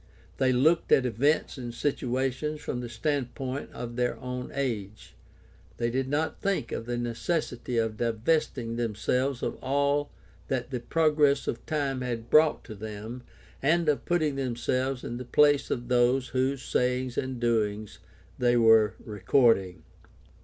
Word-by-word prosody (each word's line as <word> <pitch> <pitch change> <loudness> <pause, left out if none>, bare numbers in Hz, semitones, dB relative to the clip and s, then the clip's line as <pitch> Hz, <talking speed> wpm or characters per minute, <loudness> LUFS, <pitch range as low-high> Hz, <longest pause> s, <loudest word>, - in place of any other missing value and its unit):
They 130 -1 +3
looked 155 +7 +3
at 130 - +5
events 135 +5 +1
and 120 -2 -5
situations 135 +3 -1
from 125 - -4
the 120 -1 -5
standpoint 130 +2 -3
of 120 0 -7
their 125 0 0
own 125 0 -5
age. 110 -7 -4 0.6
They 115 0 0
did 130 +1 -1
not 155 +3 -1
think 195 -12 -1
of 115 - -4
the 120 0 -2
necessity 120 +2 -2
of 110 -1 0
divesting 115 0 0
themselves 120 +4 -1
of - - -2
all 140 +2 +1 0.4
that 130 0 -2
the 125 - -2
progress 150 +1 +2
of 115 - -3
time 140 -4 -1
had 120 -2 -4
brought 155 0 +5
to 110 - -9
them 110 +3 -7 0.4
and 165 +4 +2
of 150 -2 +1
putting 155 -5 +1
themselves 130 0 -1
in 120 - -4
the 125 - -5
place 145 +3 +3
of 120 0 -3
those 125 +1 +2
whose 130 +1 0
sayings 125 0 0
and 130 -2 -3
doings 110 -3 -1 0.4
they 120 -1 +3
were 110 -2 +5
recording. 100 - +2
125 Hz, 145 wpm, -28 LUFS, 115-140 Hz, 0.6 s, at